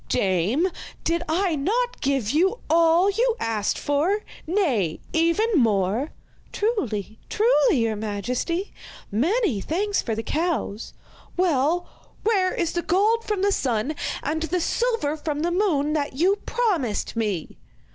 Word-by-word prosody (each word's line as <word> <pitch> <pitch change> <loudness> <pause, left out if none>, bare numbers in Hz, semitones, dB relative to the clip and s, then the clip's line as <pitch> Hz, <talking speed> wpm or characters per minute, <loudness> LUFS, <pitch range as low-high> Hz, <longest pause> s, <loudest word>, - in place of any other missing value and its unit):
'Dame, 195 - +1 0.4
did 335 +1 0
I 345 +1 +1
not 465 - -1
give 270 -6 0
you 375 +9 +2
all 335 +4 +5
you 465 +3 +1
asked 215 -3 -1
for 320 +9 +1 0.3
nay, 270 - +1
even 335 +7 +2
more?' 225 - +2 0.4
'Truly, 220 - -2
truly, 440 - +3
your 225 -1 0
majesty. 240 - -3 0.4
Many 305 - +1
thanks 400 - 0
for 225 - -2
the 225 - -3
cows.' 310 - -2 0.4
'Well, 340 -1 +2 0.4
where 390 -4 +2
is 340 -2 -1
the 345 - -1
gold 430 +7 +2
from 415 -3 -1
the 405 - +3
sun 255 - 0 0.3
and 315 +2 -1
the 325 +3 -1
silver 455 -5 0
from 300 -1 -3
the 345 +2 0
moon 325 -6 +1
that 295 -2 -1
you 370 +8 +3
promised 355 - 0
me? 210 -8 -3
320 Hz, 135 wpm, -24 LUFS, 240-390 Hz, 0.4 s, all